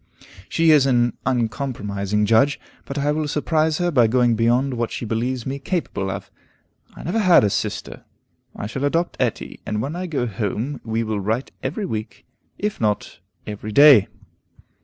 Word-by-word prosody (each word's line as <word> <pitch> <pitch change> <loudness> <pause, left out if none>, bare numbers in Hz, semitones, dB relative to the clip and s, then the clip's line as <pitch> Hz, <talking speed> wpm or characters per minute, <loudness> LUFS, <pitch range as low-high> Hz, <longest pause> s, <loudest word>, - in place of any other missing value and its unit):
She 165 -1 +3
is 145 -3 +5
an 120 -2 +2
uncompromising 105 -5 -1
judge, 115 +7 +3 0.3
but 140 - -6
I 145 +1 +1
will 155 0 -1
surprise 155 +1 +1
her 175 -1 0
by 125 -6 +4
going 120 0 +3
beyond 120 +4 +2
what 120 -1 -2
she - - -5
believes 120 +2 -2
me 135 +1 -3
capable 140 - -2
of. 95 0 -6 0.6
I - - -10
never 180 +8 -1
had 185 - +6
a 105 - +2
sister; - - -3 0.5
I - - -5
shall 130 +6 -4
adopt 165 +4 0
Etty, - - -2
and 105 - -3
when 140 +9 -3
I 180 +1 -4
go 145 -7 -1
home, 115 +5 -3
we 115 0 -1
will 110 -2 -2
write 110 +6 -2
every 215 - -3
week, 110 - -6 0.3
if 210 - -3
not 105 -2 -1 0.3
every 105 0 -6
day. 140 -3 +7
125 Hz, 170 wpm, -22 LUFS, 110-150 Hz, 0.6 s, day